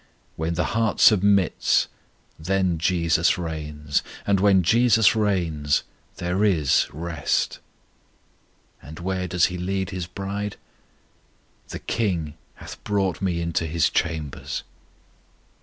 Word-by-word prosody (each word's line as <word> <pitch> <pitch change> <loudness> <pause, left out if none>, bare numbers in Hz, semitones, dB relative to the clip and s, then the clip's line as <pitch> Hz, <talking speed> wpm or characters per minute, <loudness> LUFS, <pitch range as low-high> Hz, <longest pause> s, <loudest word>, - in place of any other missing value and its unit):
When 80 +2 -2
the 90 - +1
heart 115 -1 0
submits, 100 -3 +4 0.5
then 90 0 0
JESUS 85 0 +2
reigns. 75 -3 -3 0.2
And 100 -1 +2
when 95 -2 +4
JESUS 115 +2 +4
reigns, 85 -9 0 0.3
there 90 +3 -1
is 80 -10 +3
rest. 80 -1 -2 1.2
And 80 +2 -11
where 90 +1 -3
does 90 0 +2
He 90 - -5
lead 95 0 -2
His 90 -2 -4
bride? 100 +2 -5 1.1
The - - -6
King 85 -9 -2 0.2
hath - - -11
brought 95 -4 -1
me 90 -3 -1
into 85 -1 -1
His 80 -2 +1
chambers. 80 -4 -3
90 Hz, 110 wpm, -24 LUFS, 80-100 Hz, 1.2 s, submits